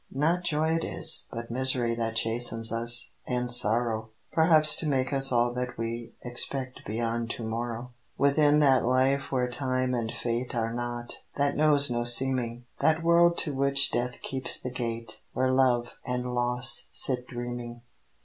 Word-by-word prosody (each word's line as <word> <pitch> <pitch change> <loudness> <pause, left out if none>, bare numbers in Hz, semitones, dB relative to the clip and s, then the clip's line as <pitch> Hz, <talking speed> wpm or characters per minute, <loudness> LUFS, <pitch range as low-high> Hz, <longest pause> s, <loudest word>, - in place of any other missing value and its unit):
Not 165 +6 0
joy 160 -1 0
it 165 0 0
is, - - +2
but 115 0 -7
misery 125 -1 +1
That 115 -1 -3
chastens 115 0 +1
us, 120 +1 0 0.2
and 125 -1 -2
sorrow; 110 -1 -1 0.2
Perhaps 160 -2 +5
to 160 - -3
make 135 -1 -1
us 135 -1 +6
all 120 0 +2
that 125 0 -5
we 115 0 -5
Expect 130 +1 -4
beyond 115 +2 -3
To 115 - -5
morrow. 120 +2 -5 0.3
Within 145 +2 +3
that 135 -3 +4
life 130 +3 +1
where 125 -2 0
time 130 0 -2
and 115 -2 -2
fate 120 +1 -4
Are 115 -1 -2
not; 120 0 -4 0.2
that 140 0 0
knows 145 -3 +3
no 120 0 -1
seeming: 120 0 +2
That 160 +1 +1
world 170 0 +4
to 150 - -4
which 140 0 +3
death 125 +1 -2
keeps 130 -1 +2
the 125 - -6
gate 115 -2 -5
Where 130 0 0
love 125 -2 +1
and 125 -1 -4
loss 125 0 +2
sit 125 -1 -1
dreaming. 120 -1 -7
125 Hz, 160 wpm, -27 LUFS, 120-135 Hz, 0.3 s, us